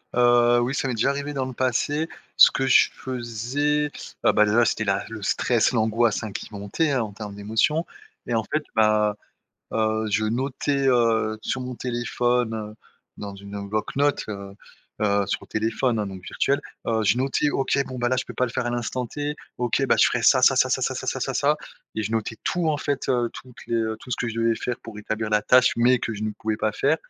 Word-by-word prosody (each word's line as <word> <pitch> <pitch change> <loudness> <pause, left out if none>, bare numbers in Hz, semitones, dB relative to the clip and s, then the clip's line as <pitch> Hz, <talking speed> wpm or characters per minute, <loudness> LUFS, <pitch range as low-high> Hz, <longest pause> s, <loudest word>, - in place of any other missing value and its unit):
Heu, 120 0 +5
oui, 125 +3 -1
ça 135 - -1
m'est 125 - -2
déjà 115 - +2
arrivé 145 +1 -3
dans 135 -2 -1
le 130 - -6
passé, 135 +6 0 0.3
ce - - +9
que 135 - -1
je 135 - +5
faisais, 130 +5 -2 0.3
heu, - - +6
bah, 105 - +5
déjà 115 +3 +3
c'était 110 - 0
la 100 -1 0
le 115 -1 -7
stress, 115 +3 +2
l'angoisse, 110 -1 +1
hein, 110 - -5
qui - - -6
montaient, 105 +10 -1
hein, 130 -4 +1
en 105 -2 -7
termes 105 -1 -7
d'émotion 110 +11 +1 0.4
et 120 - -3
en 115 -1 +1
fait, 155 +7 -2
bah, 105 -1 +3 0.6
heu, 110 0 0
je 110 +1 +1
notais, 135 +4 0
heu, 115 -3 +2
sur 130 - -2
mon 125 -1 -5
téléphone, 120 -1 0
heu, 105 -1 -6 0.4
dans 100 -1 -6
une 100 0 -7
bloc-notes, 135 +7 0
heu 100 -2 -7 0.5
heu, 100 -1 +2
sur 100 - -2
le - - -12
téléphone, 115 +2 0
hein, 105 - -2
donc 95 -1 -9
virtuel, 140 +8 0 0.3
heu, 110 -1 +1
je 115 - +3
notais, 135 +3 +1
OK, 135 0 0
bon 130 - -7
bah, 120 0 +1
là, 130 - +1
je 130 - -1
peux - - -8
pas 125 - +1
le - - -6
faire 120 - -2
à - - 0
l'instant 120 +1 -2
T, 145 +4 -4 0.2
OK, 120 -1 +1
bah, - - +3
je - - +7
ferais - - -1
ça, - - +6
ça, - - +6
ça, - - +4
ça, - - +1
ça, - - 0
ça, - - -5
ça, - - -1
ça, - - -2
ça - - +2 0.4
et 110 - -2
je 105 - -3
notais 115 0 -2
tout 175 -2 0
en 155 - +1
fait, 145 -1 -2
heu, 120 -2 +1
toutes 125 -1 -12
les, - - -1
heu, 110 -1 -1
tout 125 - -12
ce - - 0
que - - -2
je 110 - -5
devais 115 0 +2
faire 125 -1 -3
pour 115 -2 -9
établir 110 +1 -3
la 105 0 +3
tâche 125 +3 +5
mais 125 +2 +4
que 110 - -3
je 105 +1 -4
ne 110 - -2
pouvais 110 0 -3
pas 110 0 0
faire 140 +8 +2
120 Hz, 235 wpm, -24 LUFS, 110-130 Hz, 0.6 s, ce